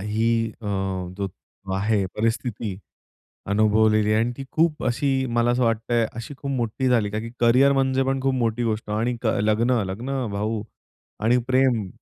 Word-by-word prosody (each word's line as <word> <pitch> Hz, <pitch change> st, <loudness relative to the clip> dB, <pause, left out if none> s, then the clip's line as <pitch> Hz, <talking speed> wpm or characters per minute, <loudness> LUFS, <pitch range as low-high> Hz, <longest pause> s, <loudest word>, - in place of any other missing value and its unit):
ही 110 Hz, +3 st, 0 dB, 0.3 s
अ, -, -, -6 dB, 0.5 s
जो 100 Hz, -1 st, -2 dB, 0.5 s
आहे 100 Hz, +1 st, +1 dB
परिस्थिती 110 Hz, -2 st, -2 dB, 0.8 s
अनुभवलेली 110 Hz, 0 st, +3 dB
आहे 110 Hz, -, +3 dB
आणि 120 Hz, +1 st, -1 dB
ती 135 Hz, -, -6 dB
खूप 160 Hz, -1 st, +1 dB
अशी 135 Hz, +2 st, +1 dB
मला 120 Hz, 0 st, +2 dB
असं 125 Hz, +1 st, +1 dB
वाटतंय, 115 Hz, 0 st, +1 dB
अशी 115 Hz, +5 st, -7 dB
खूप 140 Hz, -, -5 dB
मोठी 130 Hz, 0 st, -1 dB
झाली, 115 Hz, -5 st, +2 dB
का 105 Hz, -, -2 dB
की 115 Hz, +1 st, -7 dB
करियर 125 Hz, +4 st, +5 dB
म्हणजे 135 Hz, -1 st, +2 dB
पण 135 Hz, 0 st, 0 dB
खूप 135 Hz, 0 st, +1 dB
मोठी 120 Hz, -1 st, 0 dB
गोष्ट 110 Hz, -1 st, -2 dB
आणि 115 Hz, +3 st, 0 dB
क -, -, -1 dB, 0.2 s
लग्न 115 Hz, +3 st, +2 dB
लग्न 125 Hz, +6 st, -3 dB
भाऊ 105 Hz, +1 st, -2 dB, 0.6 s
आणि 120 Hz, +2 st, +4 dB
प्रेम. 130 Hz, -6 st, +2 dB
115 Hz, 165 wpm, -24 LUFS, 110-130 Hz, 0.8 s, करियर